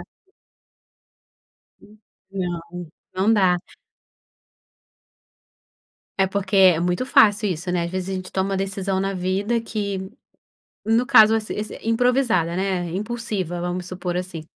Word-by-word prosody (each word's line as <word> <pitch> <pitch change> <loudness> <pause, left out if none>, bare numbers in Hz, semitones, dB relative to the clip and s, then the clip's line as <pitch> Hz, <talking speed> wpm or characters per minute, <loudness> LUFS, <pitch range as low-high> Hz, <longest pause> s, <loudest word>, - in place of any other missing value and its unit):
Exato. - - -10 1.8
Uhum 210 +1 -19 0.3
não, 175 -2 -5 0.3
não 195 +4 +2
dá. 185 -3 +3 2.6
É 190 - +4
porque 195 0 -2
é 185 -4 +6
muito 180 +8 -1
fácil 210 -4 +4
isso 175 +1 -4
né, 180 -1 0
ás 170 - -4
vezes 185 0 -4
a - - -2
gente 185 0 -7
toma 190 +1 -1
uma 195 - 0
decisão 195 0 -2
na 195 0 -2
vida 195 +6 -1
que, 200 -4 -4 0.7
no 230 +3 +2
caso 220 -4 +7
ess 220 -1 -2
ess 215 +1 -4
improvisada 230 -7 +1
né, 185 -2 -1
impulsiva 205 -3 -3
vamos 180 0 -3
supor 180 -1 -4
assim. 180 -3 -5
190 Hz, 130 wpm, -22 LUFS, 180-215 Hz, 2.6 s, caso